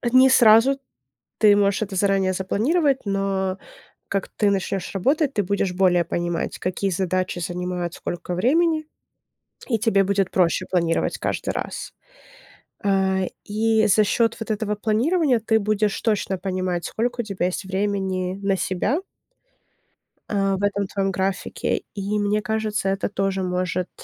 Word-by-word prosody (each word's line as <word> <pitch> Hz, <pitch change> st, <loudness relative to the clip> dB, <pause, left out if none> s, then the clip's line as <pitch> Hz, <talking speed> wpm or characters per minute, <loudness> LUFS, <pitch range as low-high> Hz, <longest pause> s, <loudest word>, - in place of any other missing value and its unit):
а 240 Hz, -, -1 dB
не 260 Hz, +1 st, +7 dB
сразу. 240 Hz, +2 st, +6 dB, 0.6 s
Ты 205 Hz, -2 st, +6 dB
можешь 200 Hz, 0 st, +2 dB
это 200 Hz, -2 st, -3 dB
заранее 195 Hz, -1 st, +2 dB
запланировать, 265 Hz, -, +1 dB
но 195 Hz, -1 st, -1 dB, 0.5 s
как 195 Hz, -1 st, -2 dB
ты 205 Hz, -2 st, +1 dB
начнёшь 195 Hz, -1 st, -2 dB
работать, 275 Hz, -, +1 dB
ты 205 Hz, -, +1 dB
будешь 195 Hz, -1 st, -1 dB
более 180 Hz, -1 st, +3 dB
понимать, 175 Hz, -1 st, -3 dB
какие 185 Hz, +2 st, -2 dB
задачи 185 Hz, 0 st, -1 dB
занимают 175 Hz, 0 st, -3 dB
сколько 175 Hz, +1 st, -5 dB
времени. 310 Hz, -, +2 dB, 0.8 s
И 230 Hz, -, +1 dB
тебе 205 Hz, -3 st, +3 dB
будет 195 Hz, -1 st, 0 dB
проще 180 Hz, 0 st, +2 dB
планировать 170 Hz, -3 st, 0 dB
каждый -, -, -2 dB
раз. -, -, -5 dB, 0.9 s
Э, 190 Hz, -1 st, +1 dB, 0.2 s
и 220 Hz, +1 st, +2 dB
за 215 Hz, +2 st, +4 dB
счёт 230 Hz, +2 st, +1 dB
вот 225 Hz, -1 st, -4 dB
этого 210 Hz, 0 st, -1 dB
планирования 250 Hz, -, +2 dB
ты 220 Hz, 0 st, +2 dB
будешь 210 Hz, -1 st, 0 dB
точно 205 Hz, -4 st, 0 dB
понимать, 185 Hz, -2 st, -2 dB
сколько 240 Hz, +2 st, -2 dB
у -, -, -6 dB
тебя 195 Hz, -4 st, -2 dB
есть 185 Hz, +2 st, -4 dB
времени 190 Hz, -1 st, -2 dB
на 195 Hz, -1 st, +1 dB
себя 205 Hz, -, -1 dB, 1.3 s
э, 195 Hz, -1 st, +1 dB
в 190 Hz, -, -4 dB
этом 200 Hz, -1 st, 0 dB
твоём 195 Hz, -1 st, -1 dB
графике. 190 Hz, 0 st, -2 dB
И 205 Hz, +1 st, -1 dB
мне 205 Hz, +1 st, +1 dB
кажется, 215 Hz, -2 st, -1 dB
это 195 Hz, +1 st, -1 dB
тоже 195 Hz, -1 st, -1 dB
может, 180 Hz, 0 st, -2 dB
195 Hz, 145 wpm, -23 LUFS, 185-215 Hz, 1.3 s, не